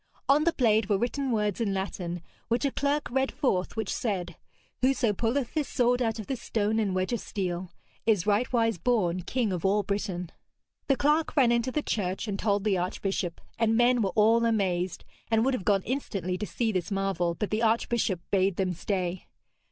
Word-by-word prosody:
On 290 Hz, +3 st, +4 dB
the 340 Hz, -, +3 dB
blade 220 Hz, -4 st, +2 dB
were 200 Hz, -, +3 dB
written 260 Hz, +5 st, -1 dB
words 210 Hz, -2 st, 0 dB
in 200 Hz, -4 st, 0 dB
Latin, 175 Hz, -3 st, -4 dB, 0.2 s
which 235 Hz, +4 st, 0 dB
a 280 Hz, -, +1 dB
clerk 285 Hz, +2 st, 0 dB
read 265 Hz, +1 st, +1 dB
forth, 220 Hz, -11 st, 0 dB
which 220 Hz, -3 st, -2 dB
said, 180 Hz, -7 st, -2 dB, 0.5 s
'Whoso 255 Hz, -4 st, +2 dB
pulleth 235 Hz, +5 st, -1 dB
this 305 Hz, -4 st, 0 dB
sword 245 Hz, 0 st, +2 dB
out 225 Hz, -2 st, 0 dB
of 215 Hz, -, -6 dB
this 260 Hz, 0 st, -4 dB
stone 220 Hz, 0 st, 0 dB
and 200 Hz, -4 st, 0 dB
wedge 185 Hz, +5 st, 0 dB
of 235 Hz, -, 0 dB
steel 180 Hz, -2 st, -4 dB, 0.4 s
is 210 Hz, -6 st, +3 dB
rightwise 225 Hz, -1 st, +1 dB
born 185 Hz, -8 st, +1 dB
King 225 Hz, +1 st, -1 dB
of 175 Hz, -, -3 dB
all 205 Hz, +2 st, +2 dB
Britain.' 185 Hz, -3 st, -3 dB, 0.6 s
The 275 Hz, -, +3 dB
clerk 300 Hz, +2 st, +2 dB
ran 255 Hz, -5 st, +5 dB
into 240 Hz, +2 st, +1 dB
the 300 Hz, +3 st, -1 dB
church 195 Hz, +1 st, -2 dB
and 200 Hz, -1 st, -3 dB
told 205 Hz, -2 st, +1 dB
the 200 Hz, -4 st, +2 dB
archbishop, 180 Hz, -1 st, -2 dB, 0.2 s
and 225 Hz, -1 st, +3 dB
men 240 Hz, 0 st, +4 dB
were 195 Hz, -, +1 dB
all 225 Hz, +2 st, +4 dB
amazed 190 Hz, -5 st, 0 dB, 0.2 s
and 225 Hz, +1 st, +3 dB
would 270 Hz, -, +2 dB
have 225 Hz, -7 st, -3 dB
gone 195 Hz, -2 st, +3 dB
instantly 195 Hz, -, -2 dB
to 210 Hz, -, -3 dB
see 230 Hz, -2 st, -1 dB
this 185 Hz, -2 st, -2 dB
marvel, 195 Hz, -4 st, 0 dB
but 210 Hz, -, -3 dB
the 215 Hz, +1 st, 0 dB
archbishop 225 Hz, -4 st, +1 dB
bade 195 Hz, -1 st, +2 dB
them 185 Hz, -1 st, 0 dB
stay. 180 Hz, 0 st, -3 dB
215 Hz, 195 wpm, -28 LUFS, 190-240 Hz, 0.6 s, ran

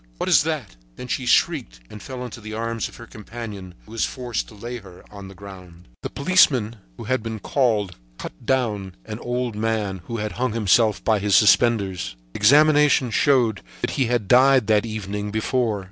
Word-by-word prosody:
what -, -, -3 dB
is -, -, +5 dB
that?" -, -, -4 dB, 0.2 s
Then 125 Hz, -, -8 dB
she 125 Hz, 0 st, -3 dB
shrieked -, -, +1 dB
and 105 Hz, -, -11 dB
fell 130 Hz, -2 st, -7 dB
into 120 Hz, -1 st, -9 dB
the 110 Hz, 0 st, -7 dB
arms 115 Hz, 0 st, -3 dB
of -, -, -15 dB
her 120 Hz, -, -11 dB
companion, 105 Hz, -4 st, -9 dB
who 110 Hz, -, -16 dB
was 115 Hz, -, -2 dB
forced 125 Hz, -3 st, -3 dB
to 110 Hz, -, -14 dB
lay 120 Hz, +4 st, -6 dB
her 95 Hz, -5 st, -14 dB
on 100 Hz, -2 st, -10 dB
the 95 Hz, -, -12 dB
ground. 90 Hz, -5 st, -13 dB
The -, -, -5 dB
policeman 135 Hz, -, +2 dB, 0.2 s
who -, -, -8 dB
had 130 Hz, -1 st, -1 dB
been 110 Hz, 0 st, -5 dB
called 105 Hz, -, 0 dB, 0.2 s
cut -, -, -9 dB
down 105 Hz, -8 st, -1 dB
an 105 Hz, +1 st, -7 dB
old 120 Hz, -2 st, -3 dB
man 105 Hz, -4 st, -2 dB
who 115 Hz, -, -5 dB
had 105 Hz, -1 st, -3 dB
hung 130 Hz, -3 st, 0 dB
himself 110 Hz, 0 st, +2 dB
with 110 Hz, -3 st, +2 dB
his 100 Hz, -1 st, +2 dB
suspenders. 100 Hz, -, +3 dB, 0.2 s
Examination 145 Hz, +1 st, +4 dB
showed 115 Hz, -6 st, +2 dB, 0.2 s
that -, -, -1 dB
he 135 Hz, -5 st, 0 dB
had 120 Hz, -4 st, -1 dB
died 130 Hz, 0 st, +5 dB
the 105 Hz, -1 st, +3 dB
evening 105 Hz, -1 st, -4 dB
before. 110 Hz, 0 st, -1 dB
110 Hz, 190 wpm, -22 LUFS, 100-125 Hz, 0.2 s, is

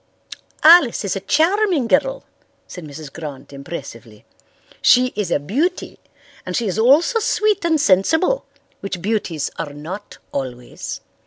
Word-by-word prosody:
"Alice 310 Hz, -9 st, +6 dB
is 200 Hz, -, -1 dB
a -, -, -2 dB
charming 325 Hz, -, +2 dB
girl," 365 Hz, -, +1 dB, 0.4 s
said 180 Hz, -, -10 dB
Mrs. 145 Hz, -1 st, -10 dB
Grant 145 Hz, -4 st, -9 dB
impressively. 115 Hz, -7 st, -9 dB, 0.6 s
"She 250 Hz, 0 st, +4 dB
is 205 Hz, -4 st, -2 dB
a 170 Hz, -, +1 dB
beauty 285 Hz, -, -2 dB, 0.4 s
and 180 Hz, -, -5 dB
she 235 Hz, -, 0 dB
is 200 Hz, +1 st, -2 dB
also 295 Hz, -, +4 dB
sweet 425 Hz, -2 st, +1 dB
and 325 Hz, -2 st, +2 dB
sensible, 305 Hz, -, +2 dB, 0.4 s
which 195 Hz, -2 st, -5 dB
beauties 185 Hz, -6 st, -2 dB
are 145 Hz, -, -4 dB
not 170 Hz, +8 st, -8 dB
always. 125 Hz, -3 st, -6 dB
205 Hz, 135 wpm, -20 LUFS, -, 0.6 s, Alice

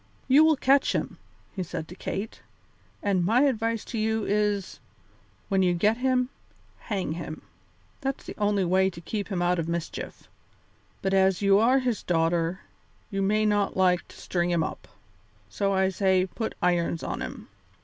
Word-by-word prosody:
"You 275 Hz, +4 st, +7 dB
will 315 Hz, 0 st, +5 dB
catch 275 Hz, +1 st, +3 dB
him," -, -, -3 dB, 0.4 s
said 170 Hz, -2 st, -4 dB
he -, -, -18 dB
to 180 Hz, -, -9 dB
Kate, 200 Hz, +3 st, -5 dB, 0.6 s
"and 195 Hz, -3 st, +2 dB
my 225 Hz, +8 st, +3 dB
advice 230 Hz, -5 st, 0 dB
to 230 Hz, -, -4 dB
you 220 Hz, 0 st, 0 dB
is, 205 Hz, -2 st, 0 dB, 0.7 s
when 195 Hz, -2 st, +2 dB
you 180 Hz, -1 st, +3 dB
get 210 Hz, +6 st, +2 dB
him, 255 Hz, 0 st, +1 dB, 0.6 s
hang 195 Hz, -7 st, -1 dB
him. 160 Hz, -1 st, -6 dB, 0.6 s
That's 270 Hz, 0 st, -3 dB
the -, -, -7 dB
only 205 Hz, -2 st, +2 dB
way 190 Hz, +2 st, +3 dB
to 170 Hz, -, -10 dB
keep 205 Hz, +4 st, -4 dB
him 185 Hz, -4 st, -1 dB
out 175 Hz, 0 st, +2 dB
of 165 Hz, 0 st, -2 dB
mischief. 170 Hz, -1 st, -5 dB, 0.8 s
But 195 Hz, 0 st, 0 dB
as 190 Hz, 0 st, +3 dB
you 200 Hz, 0 st, +5 dB
are 245 Hz, +4 st, +4 dB
his 250 Hz, -5 st, 0 dB
daughter, 165 Hz, +1 st, 0 dB, 0.5 s
you 195 Hz, -1 st, -1 dB
may 215 Hz, +2 st, +2 dB
not 205 Hz, -2 st, +1 dB
like 180 Hz, -2 st, +3 dB
to -, -, -15 dB
string 175 Hz, -1 st, -1 dB
him 170 Hz, -2 st, +2 dB
up, -, -, -6 dB, 0.6 s
so 200 Hz, -1 st, 0 dB
I 190 Hz, -1 st, +2 dB
say 190 Hz, -1 st, +2 dB
put 220 Hz, +4 st, -5 dB
irons 170 Hz, -2 st, +1 dB
on -, -, -4 dB
him. -, -, -7 dB
195 Hz, 170 wpm, -26 LUFS, 180-220 Hz, 0.8 s, You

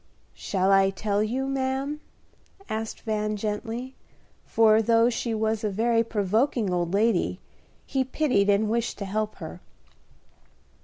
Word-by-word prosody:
"Shall 190 Hz, -1 st, 0 dB
I 195 Hz, 0 st, +5 dB
tell 200 Hz, +1 st, -1 dB
you, 245 Hz, +5 st, -1 dB
ma'am?" 270 Hz, +2 st, -2 dB, 0.7 s
asked 220 Hz, 0 st, -4 dB
Van, 215 Hz, -1 st, -1 dB
gently, 225 Hz, +5 st, -4 dB, 0.5 s
for, 220 Hz, -1 st, +4 dB
though 230 Hz, +2 st, +4 dB
she 235 Hz, 0 st, -2 dB
was 220 Hz, 0 st, -1 dB
a 210 Hz, -, +1 dB
very 230 Hz, +3 st, +2 dB
provoking 220 Hz, 0 st, 0 dB
old 175 Hz, -1 st, -1 dB
lady, 200 Hz, -3 st, +1 dB, 0.5 s
he 270 Hz, -1 st, 0 dB
pitied 255 Hz, -7 st, +1 dB
and 205 Hz, +2 st, +3 dB
wished 235 Hz, +2 st, -1 dB
to 200 Hz, -, -4 dB
help 215 Hz, +2 st, -2 dB
her. -, -, -9 dB
220 Hz, 135 wpm, -26 LUFS, 205-235 Hz, 0.7 s, I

